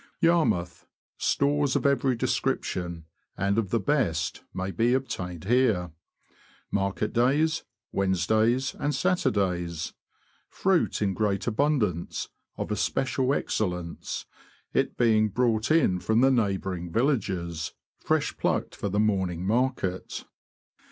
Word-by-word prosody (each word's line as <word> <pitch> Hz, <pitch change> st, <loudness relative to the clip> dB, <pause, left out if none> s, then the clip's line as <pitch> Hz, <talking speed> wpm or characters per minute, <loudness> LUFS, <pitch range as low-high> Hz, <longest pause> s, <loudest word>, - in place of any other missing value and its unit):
Yarmouth. 155 Hz, -, +1 dB, 0.2 s
— -, -, -71 dB
Stores 145 Hz, -1 st, +2 dB
of -, -, 0 dB
every 135 Hz, -2 st, +3 dB
description, 85 Hz, -6 st, -2 dB, 0.3 s
and 100 Hz, +3 st, +1 dB
of 105 Hz, -4 st, -1 dB
the 115 Hz, -, +1 dB
best, 100 Hz, -, 0 dB
may 95 Hz, +1 st, -3 dB
be 115 Hz, +8 st, +2 dB
obtained 90 Hz, -10 st, -4 dB
here. 110 Hz, -6 st, +2 dB, 0.8 s
Market 100 Hz, +2 st, -1 dB
days: 140 Hz, +6 st, +2 dB, 0.3 s
Wed 95 Hz, -1 st, 0 dB
nesdays 110 Hz, +8 st, +2 dB
and 145 Hz, 0 st, 0 dB
Saturdays. 95 Hz, -, 0 dB, 0.6 s
Fruit 185 Hz, -, +1 dB
in 100 Hz, -2 st, +1 dB
great 100 Hz, -1 st, 0 dB
abundance, 115 Hz, -, 0 dB, 0.3 s
of -, -, -4 dB
especial 130 Hz, 0 st, 0 dB
excellence, 90 Hz, -10 st, -2 dB, 0.5 s
it -, -, 0 dB
being 110 Hz, -3 st, +4 dB
brought 115 Hz, 0 st, +1 dB
in 155 Hz, -, +3 dB
from 110 Hz, +5 st, +2 dB
the 135 Hz, +1 st, +5 dB
neighbouring 95 Hz, -7 st, -1 dB
villages, 95 Hz, -, -1 dB, 0.3 s
fresh -, -, 0 dB
plucked -, -, -1 dB
for 100 Hz, -, -3 dB
the 100 Hz, +2 st, 0 dB
morn 100 Hz, -4 st, +2 dB
ing 90 Hz, +1 st, -5 dB
market. 110 Hz, -4 st, -1 dB
110 Hz, 120 wpm, -27 LUFS, 90-130 Hz, 0.8 s, the